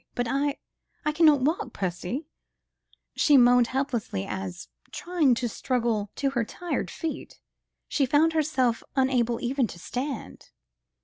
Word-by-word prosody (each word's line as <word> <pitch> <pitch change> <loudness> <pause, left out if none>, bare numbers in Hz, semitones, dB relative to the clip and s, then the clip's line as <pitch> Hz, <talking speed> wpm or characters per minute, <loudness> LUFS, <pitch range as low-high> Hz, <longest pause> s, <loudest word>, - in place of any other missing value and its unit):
But 245 -1 -1
I... 280 +3 0 0.5
I 300 - +2
cannot 305 -3 +5
walk, 275 -3 -1
Percy," 185 - -3 0.9
she 290 -3 +5
moaned 245 -1 +6
helplessly 240 - -2
as, 90 -9 -5 0.2
trying 330 -8 +1
to 240 +1 -1
struggle 230 -3 -1
to 275 -1 0
her 240 -3 0
tired 350 +10 -4
feet, 325 -2 -6 0.5
she 275 -3 +1
found 310 +5 +3
herself 270 -7 +1
unable 250 -3 +2
even 255 0 0
to 175 - -10
stand. 250 - -5
255 Hz, 130 wpm, -26 LUFS, 235-290 Hz, 0.9 s, moaned